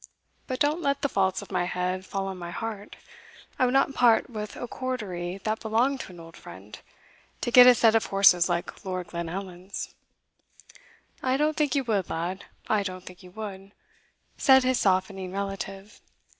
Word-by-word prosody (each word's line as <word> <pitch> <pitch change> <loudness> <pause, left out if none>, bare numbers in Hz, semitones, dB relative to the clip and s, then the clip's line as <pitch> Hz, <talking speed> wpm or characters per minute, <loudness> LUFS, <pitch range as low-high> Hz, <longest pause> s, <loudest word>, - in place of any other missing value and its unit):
But 255 -1 -3
don't 300 +4 +1
let 280 -1 -1
the 280 - +2
faults 190 -3 0
of - - -14
my 175 - 0
head 180 +1 -2
fall 195 -1 -3
on 190 -1 -5
my 175 -1 -6
heart 210 +2 -6 0.6
I 255 - +4
would 250 - -1
not 275 0 +3
part 245 -1 +3
with 210 -2 -6
a 245 - -6
Cordery 195 -10 -4
that 215 0 -1
belonged 240 +5 +1
to 190 - -7
an 175 - -13
old 165 0 -12
friend, 95 +4 -12 0.6
to 240 - -2
get 250 +1 +9
a 250 - +8
set 225 -1 +4
of 225 - +2
horses 190 -3 +5
like 175 +1 -3
Lord 185 -2 -4
Glenallan's." 180 +2 -6 1.3
"I 260 0 +1
don't 300 +1 +1
think 300 -1 +1
you 275 - +1
would, 205 -7 -1
lad 175 +4 -4 0.2
I 215 -1 +2
don't 185 -2 -6
think 180 0 -12
you 180 - -13
would," 195 0 -8 0.7
said 265 -1 +6
his 255 -1 +1
softening 190 -1 0
relative. 195 0 -6
195 Hz, 180 wpm, -26 LUFS, 185-245 Hz, 1.3 s, get